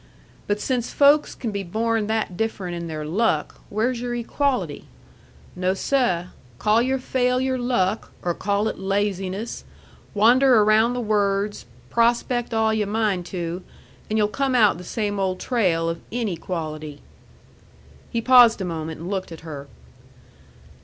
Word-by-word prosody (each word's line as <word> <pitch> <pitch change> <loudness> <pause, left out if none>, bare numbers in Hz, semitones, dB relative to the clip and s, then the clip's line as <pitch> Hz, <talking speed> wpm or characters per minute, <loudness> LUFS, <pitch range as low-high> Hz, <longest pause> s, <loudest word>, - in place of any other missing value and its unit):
But 205 0 0
since 245 0 -1
folks 290 +1 +4
can 230 - -4
be 200 -1 -3
born 220 +3 -1
that 220 -4 -1
different 195 -3 -3
in 170 0 -5
their 155 -2 -5
luck, 210 +9 0
where's 235 +3 -1
your 245 -1 -3
equality? 255 +3 -1 0.7
No, 185 +1 0
seh! 220 -8 +1 0.3
call 215 - +3
your 260 +2 +1
failure 255 0 0
luck, 225 -5 0
or 175 - 0
call 200 +4 0
it - - -4
laziness, 195 +1 -2 0.5
wander 240 +2 +5
around 220 +3 +4
the 250 - -2
words, 205 - 0 0.2
prospect 235 +1 +1
all 220 -1 +2
yu' 215 -2 0
mind 205 -4 0
to, 175 0 -4 0.5
and 215 - 0
yu'll 210 -1 +3
come 270 +4 -1
out 210 -7 +4
the - - -8
same 205 +1 -2
old 185 -1 -1
trail 180 -10 +1
of 165 0 -3
inequality." 165 -9 -4 1.1
He 235 - -1
paused 245 -2 +7
a 190 - -2
moment 160 -2 -5
and 170 - -6
looked 190 -2 -3
at 165 - -9
her. 145 -4 -8
210 Hz, 145 wpm, -23 LUFS, 185-235 Hz, 1.1 s, paused